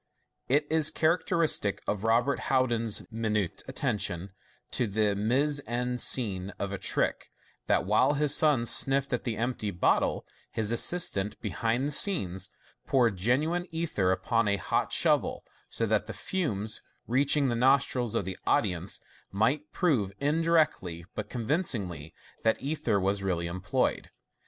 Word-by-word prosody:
It 145 Hz, +3 st, +2 dB
is 160 Hz, -1 st, +4 dB
characteristic 160 Hz, -, +2 dB
of 105 Hz, -1 st, -2 dB
Robert 115 Hz, +5 st, +2 dB
Houdin's 120 Hz, -5 st, +1 dB
minute 110 Hz, -5 st, -2 dB
attention 100 Hz, -9 st, -2 dB, 0.4 s
to 125 Hz, -, 0 dB
the 105 Hz, 0 st, +1 dB
mise 135 Hz, +8 st, +1 dB
en 125 Hz, +1 st, -2 dB
scene 100 Hz, -9 st, +1 dB
of 100 Hz, 0 st, -4 dB
a 100 Hz, -, -4 dB
trick, -, -, -1 dB, 0.4 s
that -, -, +2 dB
while 105 Hz, +8 st, +3 dB
his 145 Hz, 0 st, +3 dB
son 145 Hz, -7 st, +3 dB
sniffed 135 Hz, +3 st, +3 dB
at 125 Hz, -, -2 dB
the 115 Hz, -4 st, -2 dB
empty 115 Hz, -2 st, -2 dB
bottle, 90 Hz, -2 st, +1 dB, 0.2 s
his 110 Hz, -1 st, -1 dB
assistant, 115 Hz, -, +2 dB
behind 120 Hz, +4 st, -1 dB
the -, -, -3 dB
scenes, 95 Hz, -, +1 dB, 0.4 s
poured 120 Hz, -6 st, +2 dB
genuine 150 Hz, -, 0 dB
ether 160 Hz, -, -1 dB
upon 105 Hz, +5 st, 0 dB
a 100 Hz, 0 st, +1 dB
hot -, -, -1 dB
shovel, -, -, +1 dB, 0.2 s
so 115 Hz, -, -1 dB
that 110 Hz, -1 st, 0 dB
the 110 Hz, -, -5 dB
fumes, 110 Hz, -, -3 dB, 0.2 s
reaching 140 Hz, +3 st, +3 dB
the 120 Hz, -, -1 dB
nostrils 125 Hz, -2 st, +2 dB
of -, -, 0 dB
the 95 Hz, -1 st, -6 dB
audience, 90 Hz, -2 st, 0 dB, 0.3 s
might 130 Hz, +10 st, 0 dB
prove, 130 Hz, -, +1 dB
indirectly 150 Hz, -, +1 dB
but 105 Hz, -1 st, -5 dB
convincingly, 110 Hz, -, -2 dB, 0.3 s
that 110 Hz, -, +1 dB
ether 135 Hz, -8 st, -1 dB
was 100 Hz, +1 st, 0 dB
really 90 Hz, -3 st, -1 dB
employed. 85 Hz, +2 st, -1 dB
115 Hz, 140 wpm, -28 LUFS, 100-140 Hz, 0.4 s, is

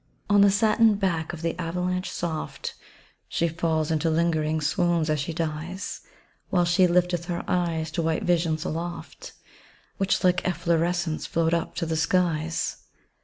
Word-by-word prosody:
On 205 Hz, 0 st, +6 dB
the 200 Hz, -, +7 dB
satin 215 Hz, +2 st, +4 dB
back 175 Hz, -5 st, -1 dB
of 170 Hz, -1 st, -8 dB
the 165 Hz, -, -1 dB
avalanche 180 Hz, +2 st, -2 dB
soft, 165 Hz, -2 st, -4 dB, 0.6 s
She 170 Hz, -, +1 dB
falls 160 Hz, -1 st, 0 dB
into 160 Hz, +1 st, +1 dB
lingering 160 Hz, -1 st, +1 dB
swoons, 165 Hz, +1 st, +1 dB
as 155 Hz, -, +1 dB
she 140 Hz, +4 st, -2 dB
dies, 165 Hz, +3 st, -4 dB, 0.5 s
While 175 Hz, -1 st, +3 dB
she 175 Hz, +2 st, +4 dB
lifteth 175 Hz, -1 st, +1 dB
her 175 Hz, -1 st, -3 dB
eyes 165 Hz, -3 st, 0 dB
to 170 Hz, -, -1 dB
white 160 Hz, -1 st, 0 dB
visions 165 Hz, -3 st, +1 dB
aloft, 175 Hz, -, -5 dB, 0.6 s
Which 195 Hz, 0 st, +1 dB
like 180 Hz, -1 st, +3 dB
efflorescence 170 Hz, -1 st, 0 dB
float 165 Hz, 0 st, +1 dB
up 170 Hz, -, -1 dB
to 170 Hz, -, -1 dB
the 160 Hz, 0 st, -1 dB
skies. 165 Hz, 0 st, 0 dB
170 Hz, 150 wpm, -26 LUFS, 160-180 Hz, 0.6 s, the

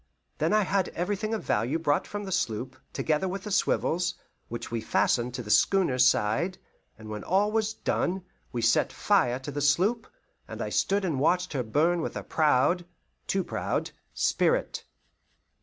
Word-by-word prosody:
Then -, -, +1 dB
I 215 Hz, 0 st, +4 dB
had 190 Hz, -1 st, +1 dB
everything 205 Hz, +5 st, -2 dB
of 220 Hz, -, -5 dB
value 115 Hz, +9 st, 0 dB
brought 150 Hz, -3 st, 0 dB
from 205 Hz, 0 st, -5 dB
the 195 Hz, -, -6 dB
sloop, 130 Hz, -, -2 dB, 0.2 s
together 155 Hz, +4 st, 0 dB
with 190 Hz, +1 st, -4 dB
the 210 Hz, -, -6 dB
swivels, 180 Hz, -3 st, +1 dB, 0.3 s
which 120 Hz, 0 st, -6 dB
we 115 Hz, -1 st, -2 dB
fastened 120 Hz, +2 st, +1 dB
to 125 Hz, -, -4 dB
the 105 Hz, -, -4 dB
schooner's 130 Hz, -, +4 dB
side; 130 Hz, -, +1 dB, 0.4 s
and 110 Hz, -1 st, -11 dB
when 105 Hz, -1 st, -6 dB
all 200 Hz, +4 st, +2 dB
was 220 Hz, 0 st, 0 dB
done, 185 Hz, -2 st, -1 dB, 0.3 s
we 120 Hz, -1 st, -3 dB
set -, -, +3 dB
fire 125 Hz, 0 st, +2 dB
to 135 Hz, +2 st, -7 dB
the 145 Hz, +1 st, -3 dB
sloop, 190 Hz, -, +2 dB, 0.4 s
and -, -, -8 dB
I -, -, -2 dB
stood 200 Hz, 0 st, +1 dB
and 155 Hz, -7 st, -1 dB
watched 180 Hz, +5 st, +1 dB
her 135 Hz, -, 0 dB
burn 155 Hz, +9 st, +1 dB
with -, -, -4 dB
a -, -, -5 dB
proud 155 Hz, +3 st, +2 dB, 0.4 s
too 190 Hz, -1 st, +1 dB
proud -, -, -2 dB, 0.2 s
spirit. -, -, 0 dB
165 Hz, 175 wpm, -27 LUFS, 125-190 Hz, 0.4 s, I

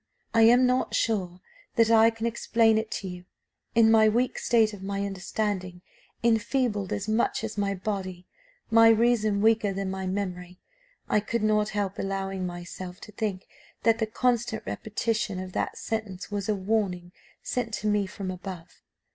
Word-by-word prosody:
I 225 Hz, -, +4 dB
am 250 Hz, +2 st, +5 dB
not 250 Hz, +1 st, +1 dB
sure 185 Hz, -5 st, -1 dB, 0.3 s
that 230 Hz, 0 st, +4 dB
I 225 Hz, 0 st, +7 dB
can 225 Hz, 0 st, -5 dB
explain 230 Hz, -1 st, +2 dB
it 220 Hz, 0 st, -5 dB
to 195 Hz, -, -4 dB
you. 180 Hz, -1 st, -8 dB, 0.5 s
In 225 Hz, -1 st, +6 dB
my 220 Hz, -1 st, +6 dB
weak 245 Hz, +3 st, 0 dB
state, 220 Hz, -4 st, +2 dB
my 200 Hz, +1 st, -2 dB
understanding 190 Hz, -2 st, -3 dB, 0.4 s
enfeebled 225 Hz, -3 st, +1 dB
as 200 Hz, -, -2 dB
much 220 Hz, +1 st, +1 dB
as 220 Hz, -1 st, -4 dB
my 200 Hz, -1 st, -1 dB
body 185 Hz, -2 st, -4 dB, 0.5 s
my 225 Hz, 0 st, +7 dB
reason 220 Hz, -3 st, +3 dB
weaker 220 Hz, -2 st, +3 dB
than 195 Hz, 0 st, -3 dB
my 190 Hz, 0 st, -4 dB
memory, 180 Hz, -2 st, -4 dB, 0.5 s
I -, -, +3 dB
could 215 Hz, +2 st, -2 dB
not 215 Hz, 0 st, +2 dB
help 200 Hz, -2 st, -2 dB
allowing 195 Hz, -1 st, -2 dB
myself 175 Hz, +1 st, -8 dB
to 210 Hz, -, -10 dB
think 205 Hz, -3 st, -3 dB, 0.4 s
that 230 Hz, 0 st, +3 dB
the 220 Hz, -, 0 dB
constant 235 Hz, 0 st, 0 dB
repetition 220 Hz, -1 st, -2 dB
of 185 Hz, -1 st, -7 dB
that -, -, -2 dB
sentence 210 Hz, -4 st, -4 dB
was 205 Hz, 0 st, -3 dB
a 210 Hz, -, +2 dB
warning 190 Hz, -3 st, -1 dB, 0.3 s
sent 245 Hz, -2 st, -2 dB
to 215 Hz, -, -3 dB
me 205 Hz, -2 st, +1 dB
from 190 Hz, -1 st, -5 dB
above. 180 Hz, -2 st, -9 dB
210 Hz, 165 wpm, -27 LUFS, 190-225 Hz, 0.5 s, I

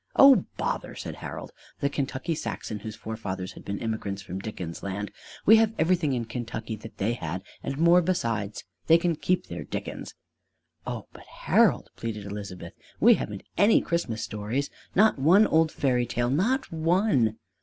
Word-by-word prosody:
"Oh, 275 Hz, -8 st, +8 dB
bother!" -, -, -2 dB
said -, -, -6 dB
Harold, -, -, -7 dB, 0.3 s
the 140 Hz, -, +1 dB
Kentucky 140 Hz, +3 st, -2 dB
Saxon 110 Hz, -7 st, -4 dB
whose 110 Hz, 0 st, -7 dB
forefathers 100 Hz, -4 st, -5 dB
had -, -, -12 dB
been 100 Hz, 0 st, -3 dB
immigrants 105 Hz, -3 st, -3 dB
from 95 Hz, 0 st, -5 dB
Dickens' 95 Hz, -5 st, -6 dB
land. 100 Hz, +1 st, -4 dB, 0.3 s
"We 220 Hz, +2 st, +8 dB
have 225 Hz, 0 st, +3 dB
everything 160 Hz, -3 st, +2 dB
in 120 Hz, -2 st, -1 dB
Kentucky 115 Hz, -1 st, -5 dB
that 110 Hz, +1 st, -11 dB
they 110 Hz, +4 st, 0 dB
had, 90 Hz, -4 st, -4 dB, 0.2 s
and 135 Hz, -, -4 dB
more 170 Hz, +3 st, +6 dB
besides. 115 Hz, -, -1 dB, 0.2 s
They 165 Hz, -, +7 dB
can 170 Hz, 0 st, 0 dB
keep 180 Hz, +4 st, 0 dB
their -, -, -6 dB
Dickens!" -, -, -6 dB, 0.7 s
"Oh, -, -, -4 dB
but -, -, -13 dB
Harold," -, -, +2 dB
pleaded 105 Hz, -3 st, -4 dB
Elizabeth, 100 Hz, -2 st, -7 dB, 0.3 s
"we -, -, +7 dB
haven't -, -, -4 dB, 0.2 s
any 210 Hz, +2 st, +6 dB
American -, -, +3 dB
Christmas 170 Hz, -11 st, -1 dB
stories! 110 Hz, +7 st, -3 dB, 0.2 s
Not 215 Hz, -6 st, +5 dB
one 180 Hz, +10 st, +6 dB
old 160 Hz, -3 st, +3 dB
fairy 125 Hz, -3 st, +1 dB
tale 120 Hz, 0 st, 0 dB
not 225 Hz, -, +1 dB
one!" 160 Hz, -, +2 dB
120 Hz, 165 wpm, -27 LUFS, 105-170 Hz, 0.7 s, Oh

